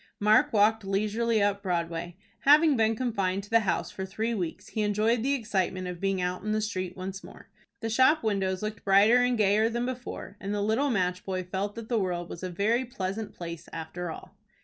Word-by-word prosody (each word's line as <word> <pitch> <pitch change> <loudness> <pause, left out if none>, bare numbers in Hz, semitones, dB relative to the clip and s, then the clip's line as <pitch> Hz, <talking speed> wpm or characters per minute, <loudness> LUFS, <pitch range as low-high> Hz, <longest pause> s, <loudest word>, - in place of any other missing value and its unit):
Mark 210 +1 +4
walked 220 +1 +3
leisurely 215 +3 +1
up 200 0 +1
Broadway. 170 -2 -3 0.2
Having 300 +1 +6
been 225 -1 +2
confined 200 -6 -1
to 205 - -14
the 230 - +6
house 205 -5 -1
for 190 - -5
three 220 +5 -2
weeks, 180 -7 -4
he 220 - -2
enjoyed 215 +3 +1
the 275 +4 +1
excitement 190 -6 -1
of 180 -1 -6
being 195 -1 0
out 180 0 -2
in 215 0 -1
the 215 - +1
street 185 -4 -3
once 190 +1 -6
more. - - -13 0.3
The 225 - -2
shop 260 +6 +4
windows 195 -3 0
looked 215 0 -4
brighter 200 +4 +6
and 245 -1 +2
gayer 215 +1 +3
than 235 +1 -2
before, 250 -4 -6
and 200 +1 -3
the 205 - -1
little 225 +7 +1
match 185 -4 0
boy 185 -1 -3
felt 195 +3 -3
that 230 -1 -7
the 235 -2 +1
world 175 -3 -2
was 170 - -7
a 185 - -3
very 215 +8 +1
pleasant 210 -3 -5
place 170 -1 -7
after 165 +2 -5
all. - - -9
205 Hz, 210 wpm, -28 LUFS, 185-225 Hz, 0.3 s, Having